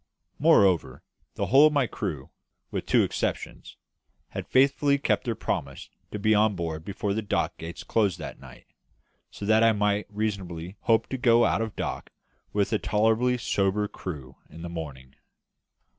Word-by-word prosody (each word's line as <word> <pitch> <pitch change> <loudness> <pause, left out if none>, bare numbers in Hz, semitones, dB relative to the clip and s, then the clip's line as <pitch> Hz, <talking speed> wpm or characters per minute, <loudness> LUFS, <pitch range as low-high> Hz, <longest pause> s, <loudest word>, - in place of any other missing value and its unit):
Moreover, 95 -6 +3 0.3
the - - -1
whole 140 +5 +7
of 155 - -1
my 140 -3 +3
crew, 80 - -5 0.4
with - - -4
two - - +4
exceptions, - - -4 0.5
had - - -6
faithfully 140 +2 +3
kept 140 - 0
their 115 -2 -1
promise 70 -8 -4 0.2
to - - -5
be 110 +1 +2
on 105 -1 +3
board 80 -3 -4
before 100 +2 -3
the 110 - -1
dock 105 - -1
gates 85 +1 -7
closed 105 -6 +1
that - - -8
night, - - -14 0.6
so 100 - -8
that 110 +1 +4
I 115 0 +5
might 105 0 0
reasonably 95 -4 -4
hope 115 -1 +2
to 130 - -3
go 120 -1 +5
out - - +1
of 110 -2 -4
dock - - -4 0.4
with 100 +1 0
a 110 - +2
tolerably 115 +4 +2
sober 105 -2 0
crew 70 -10 -8
in 80 - -11
the 85 - -5
morning. 70 -6 -8
105 Hz, 165 wpm, -26 LUFS, 85-115 Hz, 0.6 s, whole